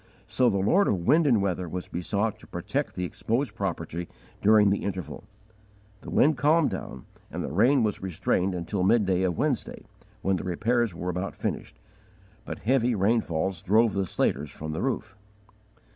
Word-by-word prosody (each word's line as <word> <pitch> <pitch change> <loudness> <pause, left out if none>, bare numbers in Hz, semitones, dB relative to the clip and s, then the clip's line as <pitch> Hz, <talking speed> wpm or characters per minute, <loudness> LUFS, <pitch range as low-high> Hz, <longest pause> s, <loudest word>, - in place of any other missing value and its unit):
So 120 +3 +2
the 100 - 0
Lord 175 - +3
of 85 -4 0
wind 160 - +4
and 115 -7 +3
weather 90 -2 -2
was 90 +2 -5
besought 100 +4 -2
to - - -15
protect - - -3
the 90 - -3
exposed 115 +9 -2
property 85 -3 -4 0.3
during 105 -1 +5
the 100 - -1
interval. 90 -4 -5 0.8
The - - -9
wind 150 0 +3
calmed 150 +3 +3
down, 65 - -7 0.2
and - - -4
the - - -4
rain 120 - +4
was 105 -2 -1
restrained 95 0 0
until 90 +3 -3
midday 95 -2 +3
of 90 -3 0
Wednesday, 145 -5 -2 0.4
when 95 -1 +1
the - - -5
repairs 110 +3 0
were 90 +2 -4
about 90 +2 -3
finished, - - -4 0.7
but - - -5
heavy 125 -1 +2
rainfalls 95 -4 0
drove 110 +3 +3
the 95 -1 -1
slaters 75 -2 0
from 75 +3 -7
the 80 - -3
roof. 115 -5 -2
100 Hz, 170 wpm, -27 LUFS, 90-115 Hz, 0.8 s, during